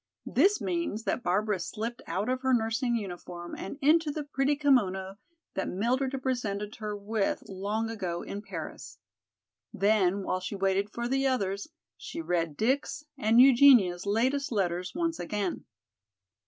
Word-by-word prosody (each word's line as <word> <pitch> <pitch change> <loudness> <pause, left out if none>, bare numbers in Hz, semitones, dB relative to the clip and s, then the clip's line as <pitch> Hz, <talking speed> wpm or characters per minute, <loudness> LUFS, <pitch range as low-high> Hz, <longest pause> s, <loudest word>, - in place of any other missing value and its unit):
This 390 +10 +3
means 340 - -2
that 250 - -1
Barbara 205 0 0
slipped 230 +6 -4
out 200 +4 -2
of 255 0 -1
her 260 -1 +3
nursing 230 +2 0
uniform 175 -4 -6
and 195 - -6
into 315 +2 +4
the 295 +1 -3
pretty 280 0 0
kimono 195 -10 +1 0.4
that 190 - -2
Mildred 255 +7 0
had 265 -1 -4
presented 210 -5 -2
her 210 -2 -4
with 205 0 -1
long 205 +3 -2
ago 185 -6 -4
in 200 - -6
Paris. 190 -6 -8 0.7
Then, 200 -1 +2
while 185 - -1
she 185 +2 -5
waited 195 +1 +1
for 235 +2 -3
the 270 +2 +1
others, 200 -6 -1 0.3
she - - -7
read 170 - -1
Dick's 275 +5 0
and 230 -3 +3
Eugenia's 245 -9 +6
latest 255 +7 +1
letters 180 -2 -1
once 335 -1 -1
again. 195 +1 -3
215 Hz, 150 wpm, -29 LUFS, 195-260 Hz, 0.7 s, Eugenia's